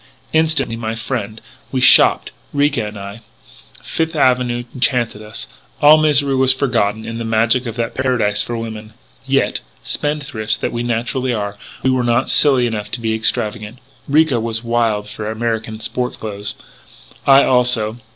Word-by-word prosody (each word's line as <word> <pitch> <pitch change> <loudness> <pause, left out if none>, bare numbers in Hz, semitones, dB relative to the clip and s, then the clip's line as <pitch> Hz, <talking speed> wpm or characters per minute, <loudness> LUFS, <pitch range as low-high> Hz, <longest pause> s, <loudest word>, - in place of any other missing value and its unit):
"Instantly, 155 -7 +1
my 115 -1 -4
friend, 115 -3 -4 0.3
we 130 - 0
shopped, 125 - +5 0.2
Ricca 145 -6 +1
and 105 0 -8
I. 100 +2 -8 0.6
Fifth 160 0 -2
Avenue 125 -3 +2
enchanted 120 -4 0
us. 105 0 -7 0.3
All 150 +1 +7
misery 145 -3 +3
was 130 0 +3
forgotten 115 -5 0
in 115 0 -5
the - - -3
magic 115 +3 +1
of 115 - -5
that 115 -1 -2
paradise 120 -6 0
for 120 +2 -4
women. 110 -1 -7 0.3
"Yet, 135 0 +1 0.2
spendthrifts 140 -8 -2
that - - -3
we 120 - -2
naturally 120 +2 -1
are, 100 -1 -3 0.3
we 130 - +3
were 130 -1 +1
not 120 0 +1
silly 135 -4 +4
enough 105 -3 -3
to 120 - -2
be 110 -1 -1
extravagant. 110 0 -1 0.3
Ricca 150 -3 +3
was 115 0 -3
wild 115 -3 0
for 105 0 -6
American 110 -1 -3
sport 125 +2 -3
clothes. 105 -1 -4 0.7
I, 135 0 +7
also. 125 -3 +2
120 Hz, 155 wpm, -18 LUFS, 110-130 Hz, 0.7 s, All